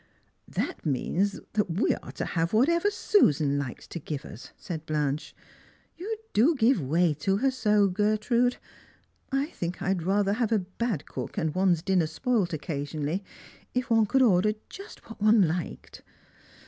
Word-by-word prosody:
That -, -, -3 dB
means 175 Hz, +8 st, 0 dB
that 210 Hz, -3 st, +1 dB
we 170 Hz, +4 st, +1 dB
are -, -, -8 dB
to -, -, -3 dB
have 165 Hz, +1 st, -1 dB
whatever 335 Hz, -, +3 dB
Susan 150 Hz, -, +2 dB
likes 130 Hz, -4 st, -6 dB
to 170 Hz, -, -5 dB
give 150 Hz, -1 st, -5 dB
us! 115 Hz, -, -11 dB
" -, -, -40 dB
said 160 Hz, -3 st, -7 dB
Blanche. 150 Hz, -1 st, -2 dB, 0.3 s
" -, -, -33 dB
You 435 Hz, +5 st, -3 dB, 0.2 s
do 275 Hz, +10 st, +4 dB
give 245 Hz, -, +3 dB
way 160 Hz, +4 st, +2 dB
to 195 Hz, +6 st, +1 dB
her 265 Hz, +5 st, +2 dB
so, 210 Hz, -5 st, +3 dB
Gertrude. 215 Hz, +5 st, +1 dB, 0.7 s
I 275 Hz, +1 st, +1 dB
think 175 Hz, +1 st, -4 dB
I'd 190 Hz, -2 st, 0 dB
rather 195 Hz, +3 st, +1 dB
have 230 Hz, 0 st, 0 dB
a 225 Hz, -, +4 dB
bad 195 Hz, -, -3 dB
cook, -, -, -6 dB
and 160 Hz, -6 st, 0 dB
one's 185 Hz, -3 st, +2 dB
dinner 185 Hz, -4 st, +2 dB
spoilt 210 Hz, -, 0 dB
occa 155 Hz, -2 st, -4 dB
sionally, 150 Hz, +5 st, -3 dB, 0.5 s
if 250 Hz, 0 st, -1 dB
one 225 Hz, -2 st, +4 dB
could 265 Hz, +5 st, +3 dB
order 210 Hz, -2 st, +4 dB, 0.2 s
just 395 Hz, +2 st, -11 dB
what 225 Hz, -2 st, -11 dB
one 215 Hz, 0 st, +6 dB
hked. 170 Hz, 0 st, -3 dB
195 Hz, 170 wpm, -27 LUFS, 160-230 Hz, 0.7 s, one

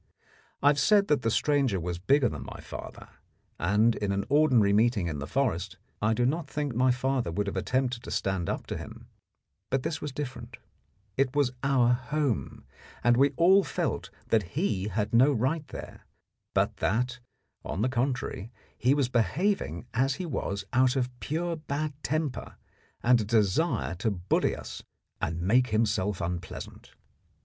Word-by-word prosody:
I 145 Hz, -, +7 dB
have 145 Hz, -1 st, +2 dB
said 200 Hz, +6 st, +4 dB
that 150 Hz, -3 st, +3 dB
the 115 Hz, -, +1 dB
stranger 135 Hz, -4 st, +2 dB
was 85 Hz, 0 st, -4 dB
bigger 135 Hz, +8 st, +3 dB
than -, -, -5 dB
my -, -, -9 dB
father, -, -, -9 dB, 0.5 s
and 105 Hz, +7 st, +3 dB
in 100 Hz, -1 st, -1 dB
an 100 Hz, 0 st, -1 dB
ordinary 130 Hz, -9 st, +4 dB
meeting 110 Hz, -2 st, +3 dB
in 75 Hz, -4 st, -3 dB
the 75 Hz, -, -5 dB
forest 125 Hz, -, -1 dB, 0.2 s
I 110 Hz, +1 st, +2 dB
do 120 Hz, -, +2 dB
not 155 Hz, +5 st, 0 dB
think 145 Hz, -3 st, -2 dB
my 125 Hz, +3 st, +3 dB
father 125 Hz, -4 st, 0 dB
would 100 Hz, +5 st, -1 dB
have 100 Hz, -, -4 dB
attempted 125 Hz, +4 st, 0 dB
to -, -, -9 dB
stand 95 Hz, -3 st, -1 dB
up -, -, -3 dB
to -, -, -4 dB
him; -, -, -10 dB, 0.6 s
but 130 Hz, -1 st, 0 dB
this 155 Hz, -, -3 dB
was 150 Hz, -, -4 dB
different. 130 Hz, -4 st, -6 dB, 0.6 s
It 135 Hz, 0 st, +1 dB
was 140 Hz, -4 st, +2 dB
our 135 Hz, -3 st, +3 dB
home, 135 Hz, -1 st, -2 dB, 0.4 s
and 120 Hz, 0 st, +5 dB
we 135 Hz, +3 st, +5 dB
all 190 Hz, +4 st, +6 dB
felt -, -, -2 dB, 0.2 s
that 105 Hz, 0 st, 0 dB
he 105 Hz, -, 0 dB
had 105 Hz, +1 st, -2 dB
no 130 Hz, +5 st, +6 dB
right 140 Hz, +5 st, 0 dB
there, -, -, -10 dB, 0.5 s
but -, -, +1 dB
that, 125 Hz, +9 st, 0 dB, 0.4 s
on 100 Hz, -, -2 dB
the -, -, +3 dB
contrary, 120 Hz, -4 st, -2 dB, 0.2 s
he 130 Hz, +4 st, +2 dB
was 140 Hz, -4 st, +2 dB
behaving 125 Hz, -, 0 dB
as 135 Hz, +3 st, +1 dB
he 185 Hz, -, -5 dB
was 100 Hz, -, -3 dB
out 130 Hz, +1 st, +4 dB
of 125 Hz, -1 st, 0 dB
pure 170 Hz, +3 st, -2 dB
bad 150 Hz, 0 st, -3 dB
temper 155 Hz, -3 st, -2 dB, 0.5 s
and 120 Hz, -1 st, +5 dB
a -, -, -1 dB
desire 105 Hz, -, +1 dB
to 110 Hz, -, +1 dB
bully 95 Hz, -3 st, 0 dB
us -, -, -8 dB, 0.4 s
and 85 Hz, +2 st, -2 dB
make 125 Hz, +7 st, +4 dB
himself 105 Hz, -4 st, 0 dB
unpleasant. 90 Hz, +1 st, -6 dB
125 Hz, 170 wpm, -28 LUFS, 105-140 Hz, 0.6 s, I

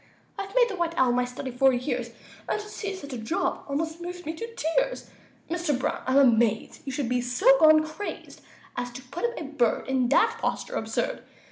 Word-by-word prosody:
I've 395 Hz, +3 st, -6 dB
made -, -, +6 dB
the 415 Hz, -, -4 dB
white 340 Hz, -2 st, -1 dB
owl 255 Hz, -2 st, +4 dB
my 250 Hz, 0 st, +2 dB
study 250 Hz, +1 st, -6 dB
for 265 Hz, +2 st, +4 dB
years, 245 Hz, -1 st, -2 dB, 0.4 s
And -, -, 0 dB
to 420 Hz, -, -8 dB
see 400 Hz, -1 st, -5 dB
such 285 Hz, -7 st, -8 dB
a 245 Hz, -, -4 dB
job 350 Hz, -, -1 dB
almost 320 Hz, +4 st, -2 dB
moves 355 Hz, +1 st, -6 dB
me 315 Hz, -, -3 dB
to 460 Hz, +7 st, -7 dB
tears! -, -, -1 dB, 0.4 s
Mr. 335 Hz, -4 st, 0 dB
Brown, 260 Hz, -, -2 dB
I'm 260 Hz, +1 st, +3 dB
amazed 230 Hz, -5 st, +3 dB
You 270 Hz, -, -3 dB
should 265 Hz, -1 st, -2 dB
be 250 Hz, +1 st, +1 dB
so 245 Hz, -, -3 dB
gone 310 Hz, 0 st, +7 dB
crazed 315 Hz, +6 st, -7 dB, 0.3 s
As 245 Hz, 0 st, -3 dB
to 255 Hz, +1 st, -8 dB
put 275 Hz, -, -4 dB
up 475 Hz, 0 st, -2 dB
a -, -, -4 dB
bird 275 Hz, -6 st, 0 dB
In 260 Hz, -2 st, +1 dB
that 455 Hz, -, +3 dB
posture -, -, -2 dB
absurd! -, -, -2 dB
295 Hz, 210 wpm, -27 LUFS, 250-355 Hz, 0.4 s, gone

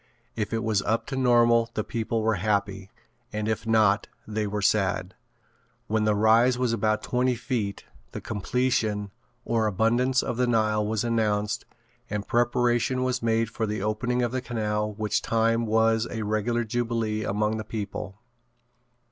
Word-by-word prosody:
If 105 Hz, -2 st, -2 dB
it 115 Hz, 0 st, -1 dB
was 110 Hz, -3 st, +1 dB
up 115 Hz, +3 st, 0 dB
to 135 Hz, -, -3 dB
normal 120 Hz, -2 st, +4 dB
the 110 Hz, -, 0 dB
people 115 Hz, 0 st, -2 dB
were 110 Hz, 0 st, +2 dB
happy 100 Hz, -2 st, -1 dB, 0.4 s
and 105 Hz, 0 st, -3 dB
if 110 Hz, +1 st, -2 dB
not 110 Hz, -2 st, +3 dB, 0.2 s
they 105 Hz, -1 st, -2 dB
were 105 Hz, 0 st, -3 dB
sad. 95 Hz, -2 st, +1 dB, 0.7 s
When 110 Hz, 0 st, 0 dB
the 105 Hz, -1 st, +3 dB
rise 115 Hz, +4 st, +4 dB
was 125 Hz, -2 st, 0 dB
about 110 Hz, 0 st, 0 dB
twenty 125 Hz, 0 st, +1 dB
feet 115 Hz, -5 st, -3 dB, 0.3 s
the -, -, -5 dB
"Completion" 110 Hz, -2 st, -1 dB, 0.3 s
or 115 Hz, -2 st, +1 dB
"Abundance 120 Hz, +6 st, +2 dB
of 115 Hz, -, -3 dB
the 125 Hz, 0 st, +2 dB
Nile" 110 Hz, -2 st, +2 dB
was 105 Hz, 0 st, -1 dB
announced 105 Hz, -3 st, 0 dB, 0.4 s
and 105 Hz, -1 st, -3 dB
preparation 120 Hz, +2 st, +1 dB
was 130 Hz, 0 st, -1 dB
made 115 Hz, 0 st, +1 dB
for 110 Hz, 0 st, -2 dB
the 105 Hz, -1 st, -3 dB
opening 120 Hz, +3 st, 0 dB
of 120 Hz, -, 0 dB
the 130 Hz, 0 st, -2 dB
canal 105 Hz, -3 st, -2 dB
which 105 Hz, 0 st, -1 dB
time 115 Hz, 0 st, +1 dB
was 110 Hz, +1 st, +2 dB
a 110 Hz, -2 st, -4 dB
regular 110 Hz, +3 st, 0 dB
jubilee 115 Hz, -2 st, -1 dB
among 105 Hz, +2 st, 0 dB
the 110 Hz, -, -4 dB
people. 105 Hz, -2 st, -6 dB
110 Hz, 160 wpm, -26 LUFS, 105-120 Hz, 0.7 s, normal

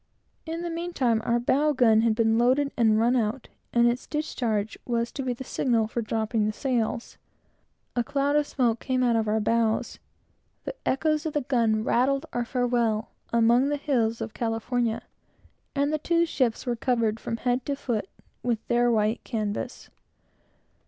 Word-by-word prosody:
In 330 Hz, +1 st, -3 dB
the 345 Hz, -, -3 dB
mean 340 Hz, +1 st, -4 dB
time 235 Hz, -7 st, +2 dB
our 235 Hz, +1 st, +1 dB
bow 290 Hz, +5 st, +2 dB
gun 225 Hz, -4 st, +4 dB
had 225 Hz, -1 st, +2 dB
been 225 Hz, 0 st, +2 dB
loaded 265 Hz, +4 st, +3 dB
and 220 Hz, -3 st, +3 dB
run 240 Hz, +3 st, +3 dB
out, 230 Hz, +1 st, -1 dB, 0.2 s
and 235 Hz, 0 st, +4 dB
its 240 Hz, +1 st, -1 dB
discharge 230 Hz, -8 st, -2 dB
was 235 Hz, -1 st, -1 dB
to 275 Hz, -, -5 dB
be 260 Hz, -1 st, -1 dB
the 245 Hz, +2 st, -5 dB
signal 235 Hz, -3 st, +1 dB
for 230 Hz, +2 st, -3 dB
dropping 220 Hz, -1 st, 0 dB
sails. 235 Hz, -2 st, -2 dB, 0.8 s
A 240 Hz, -, +2 dB
cloud 285 Hz, +2 st, 0 dB
of 295 Hz, 0 st, +2 dB
smoke 235 Hz, -4 st, +1 dB
came 255 Hz, -1 st, 0 dB
out 240 Hz, -2 st, +3 dB
of 220 Hz, -1 st, +1 dB
our 215 Hz, +1 st, +2 dB
bows; 225 Hz, +1 st, 0 dB, 0.6 s
the -, -, -4 dB
echoes 310 Hz, +3 st, +1 dB
of 310 Hz, -, -4 dB
the 295 Hz, -, +1 dB
gun 230 Hz, -4 st, +1 dB
rattled 270 Hz, +6 st, +1 dB
our 240 Hz, 0 st, -1 dB
farewell 235 Hz, -3 st, 0 dB, 0.2 s
among 235 Hz, +4 st, +4 dB
the 290 Hz, -, 0 dB
hills 235 Hz, -6 st, 0 dB
of 225 Hz, -1 st, -5 dB
California; 230 Hz, 0 st, -1 dB, 0.7 s
and 285 Hz, +2 st, +1 dB
the 310 Hz, -, 0 dB
two 340 Hz, +2 st, +2 dB
ships 255 Hz, -8 st, -1 dB
were 245 Hz, -2 st, 0 dB
covered, 230 Hz, -2 st, 0 dB
from 230 Hz, -, -4 dB
head 245 Hz, +1 st, 0 dB
to 285 Hz, -, 0 dB
foot, 225 Hz, -8 st, -3 dB, 0.3 s
with 235 Hz, -3 st, -1 dB
their 240 Hz, 0 st, +3 dB
white 220 Hz, 0 st, +1 dB
canvas. 210 Hz, -3 st, -4 dB
240 Hz, 170 wpm, -26 LUFS, 225-270 Hz, 0.8 s, gun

